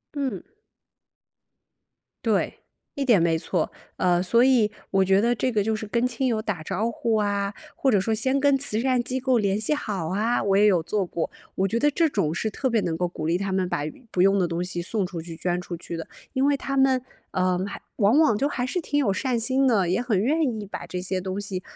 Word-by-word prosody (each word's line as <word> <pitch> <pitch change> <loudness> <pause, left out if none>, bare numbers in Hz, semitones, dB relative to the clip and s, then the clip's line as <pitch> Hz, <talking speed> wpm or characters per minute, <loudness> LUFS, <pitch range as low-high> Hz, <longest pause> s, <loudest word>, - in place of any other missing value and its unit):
嗯。 265 -9 -2 1.8
对， - - 0 0.4
一 280 - -1
点 230 -10 +4
没 165 -1 +2
错， 165 0 -1 0.3
呃， 175 -1 +2
所 230 +6 +3
以 235 -5 +4 0.2
我 195 0 +4
觉 190 +1 +4
得 235 +3 +2
这 255 +3 0
个 215 -3 +1
就 220 +2 0
是 215 - -5
跟 235 +4 +1
亲 250 +2 -2
友 225 -3 0
打 205 -7 -3
招 195 +7 -1
呼 230 -1 -1
啊， 200 -1 0 0.2
或 270 - +2
者 205 - +4
说 220 +3 0
先 260 +5 +1
跟 280 0 +4
慈 260 -5 0
善 250 0 +1
机 260 +1 -2
构 255 -1 +2
联 200 -1 +1
系 220 - +2
好 205 - -3
啊， 215 +7 0
我 195 -1 +1
也 205 +1 +5
有 185 -5 +4
做 190 +4 -1
过。 170 -1 -3 0.3
我 190 - +1
觉 225 +4 -1
得 295 +4 +3
这 330 +3 +2
种 195 - 0
是 220 +5 -1
特 260 +5 -2
别 230 -2 +2
能 170 -5 -1
够 175 +1 -1
鼓 155 - -6
励 170 +2 +2
他 195 0 -3
们 190 -1 0
把 175 -4 -2 0.3
不 180 - 0
用 195 +1 +4
的 180 - +2
东 170 +1 -2
西 175 -1 -4
送 195 +2 -1
出 175 -3 -6
去、 165 0 -8
捐 175 +1 -1
出 180 -1 -6
去 170 0 -7
的， 165 - -6 0.2
因 265 0 +1
为 285 0 +3
他 275 0 -3
们 265 -1 +4 0.3
呃， 185 -1 +1
还 200 - -7 0.2
往 215 +5 +4
往 305 -10 +4
就 275 - +1
还 250 -4 -2
是 360 - -2
挺 295 -3 -2
有 265 -9 +2
善 245 +5 0
心 260 +4 +2
的， 200 -8 +2
也 185 +6 +1
很 240 -5 0
愿 305 +7 +2
意 225 -8 -1
把 195 - -7
这 180 - -4
些 185 0 -2
东 190 +2 -4
西 195 -2 -4
210 Hz, 255 characters per minute, -25 LUFS, 185-250 Hz, 1.8 s, 也